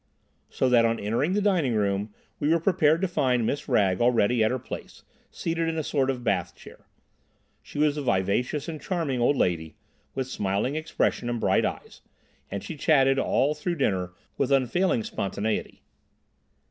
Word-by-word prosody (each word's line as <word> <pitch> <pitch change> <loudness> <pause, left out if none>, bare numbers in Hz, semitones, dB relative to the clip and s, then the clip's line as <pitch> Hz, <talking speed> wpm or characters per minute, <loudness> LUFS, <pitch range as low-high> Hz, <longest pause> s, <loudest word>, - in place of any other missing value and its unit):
So 130 - 0
that 120 -2 +5
on 115 0 +1
entering 120 - 0
the 205 0 +1
dining 170 - +2
room 100 0 0 0.3
we 145 - 0
were 165 +1 +4
prepared 160 -2 +3
to 190 - +2
find 130 -8 +1
Miss 140 +5 -2
Wragge 100 -6 +2
already 120 -1 +3
at 110 - +3
her 130 - -1
place, 120 - -9 0.3
seated 165 0 -2
in 160 - -3
a 160 - -1
sort 135 -2 0
of 125 -2 -2
bath 95 -7 -1
chair. - - -15 0.7
She - - -11
was 150 0 +2
a - - -2
vivacious 120 +5 0
and 155 -3 -6
charming 150 -8 -2
old 130 +4 +3
lady, 80 -6 0 0.4
with 130 - -1
smiling 100 +3 -1
expression 155 -5 -1
and 120 -1 -2
bright - - +2
eyes, - - -6 0.5
and 100 - -5
she 165 - -6
chatted 135 -3 +3
all 145 +2 +2
through 170 +4 -3
dinner 95 - -1 0.3
with 140 0 +1
unfailing 135 +1 +2
spontaneity. 105 +2 -3
130 Hz, 170 wpm, -26 LUFS, 110-150 Hz, 0.7 s, that